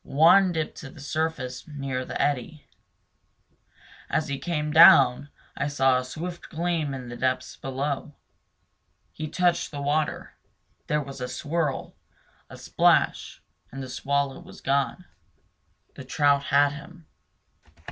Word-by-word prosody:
One 175 +6 +5
dipped 160 -2 -3
to 135 - -9
the 145 - -15
surface 140 -3 -3
near 135 -4 -4
the - - -5
eddy. 145 +2 -2 1.4
As 155 +1 -1
he 140 -1 -3
came 150 -1 -2
down 145 -3 +7 0.3
I 140 - -2
saw 135 -3 +2
a - - -4
swift 170 +7 -7
gleam 165 -3 -1
in 130 -2 -8
the 120 - -7
depths 130 +1 -2
below. 140 +2 -4 1.0
He 155 - -6
touched 175 0 +1
the 145 - -7
water; 150 +2 -1 0.5
there 150 0 0
was 135 -1 -9
a 125 - -2
swirl, 145 +3 -3 0.5
a - - -11
splash - - +1 0.3
and 135 +1 -6
the 130 - -8
swallow 140 +3 -1
was 175 +2 -13
gone. 140 +5 -1 0.9
The 140 - -10
trout 140 +1 +2
had 145 +1 +4
him. 165 +3 -12
145 Hz, 135 wpm, -25 LUFS, 135-155 Hz, 1.4 s, down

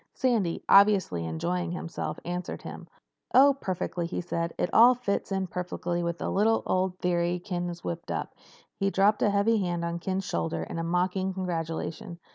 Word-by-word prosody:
Sandy, 225 -10 0
obviously 195 - +5
enjoying 175 - -2
himself, 170 -1 -4
answered 175 +1 -4
him. - - -8 0.5
"Oh, 275 +2 +8
perfectly," 180 -2 -2
he 170 - -3
said. 170 -1 -2
"It - - -1
all 240 +3 +8
fits 205 -5 -2
in 190 -1 0
perfectly 180 -1 -3
with 170 0 -2
a - - -1
little 220 +3 +2
old 185 0 0
theory 175 0 0
Ken 175 -1 -3
had 175 -1 -5
whipped 170 0 -5
up." - - -3 0.5
He 195 -1 +2
dropped 200 +2 +3
a - - +4
heavy 205 +2 +2
hand 175 -3 -1
on 170 0 -3
Ken's 190 +2 -2
shoulder 165 - -2
in 165 - -4
mock 180 +2 +1
congratulation. 175 -3 -3
180 Hz, 170 wpm, -28 LUFS, 170-195 Hz, 0.5 s, Oh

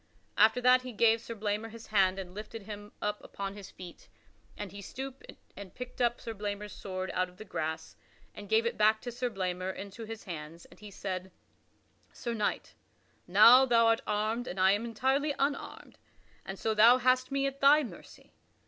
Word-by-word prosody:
After 220 +3 +5
that 250 +1 +5
he 255 -1 -8
gave 225 +1 +3
Sir 230 - -7
Blamor 210 +1 -2
his 230 0 -11
hand 190 -3 +2
and 185 -2 -7
lifted 215 +1 -8
him 205 0 -9
up 210 0 -2
upon 195 0 -6
his 200 -1 -10
feet. 180 -2 -12 0.5
And 205 -3 -6
he 200 +1 -9
stooped 265 +6 -8 0.2
and 200 -2 -10
picked 250 0 -7
up 240 0 +2
Sir 230 -2 -6
Blamor's 205 -1 -5
sword 185 -1 -5
out 185 0 0
of 180 - -20
the 215 - -10
grass 160 -5 -4 0.4
and 205 -1 -10
gave 225 +1 +3
it 235 - -2
back 215 +1 +4
to 245 - -5
Sir 245 +1 -2
Blamor 185 -3 -3
into 200 +4 -8
his 225 0 -8
hands, 165 -2 -8
and - - -18
he 210 -1 -10
said: 190 -1 -5 0.8
"Sir 235 - -5
Knight, 210 -2 -2 0.5
now 225 +8 +8
thou 235 -3 +4
art 225 0 +3
armed 215 +4 -1
and 185 - -5
I 190 +1 +5
am 205 +3 0
entirely 265 +5 0
unarmed, 280 +1 -3 0.5
and 195 - -5
so 220 +2 -1
thou 230 +4 +7
hast 255 +1 +2
me 275 0 0
at 275 0 -4
thy 290 +2 +6
mercy. 245 - -12
215 Hz, 195 wpm, -30 LUFS, 195-240 Hz, 0.8 s, now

